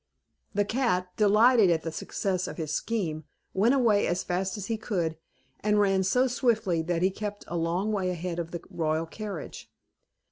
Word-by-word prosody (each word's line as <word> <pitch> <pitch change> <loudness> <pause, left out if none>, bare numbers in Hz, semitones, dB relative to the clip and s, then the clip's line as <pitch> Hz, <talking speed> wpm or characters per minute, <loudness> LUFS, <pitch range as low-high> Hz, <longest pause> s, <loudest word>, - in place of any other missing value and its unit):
The 205 0 +2
cat, 200 -6 0
delighted 215 +1 +5
at 165 -2 +1
the 165 - -3
success 185 +3 -2
of - - -7
his 155 -3 -3
scheme, 165 -7 -2 0.3
went 225 +8 +3
away 225 -6 +3
as 175 +1 0
fast 185 +3 -2
as 200 - -5
he 225 - -1
could, 180 -7 -2 0.4
and 210 0 +2
ran 195 -2 +3
so 250 +8 +3
swiftly 225 -9 +1
that 170 +1 -1
he 190 - +3
kept 205 +1 -5
a 175 - -5
long 170 +5 0
way 195 -3 0
ahead 175 -1 -3
of 165 -1 -3
the 170 -1 -6
royal 160 0 0
carriage. 200 -2 -7
190 Hz, 180 wpm, -28 LUFS, 170-215 Hz, 0.4 s, delighted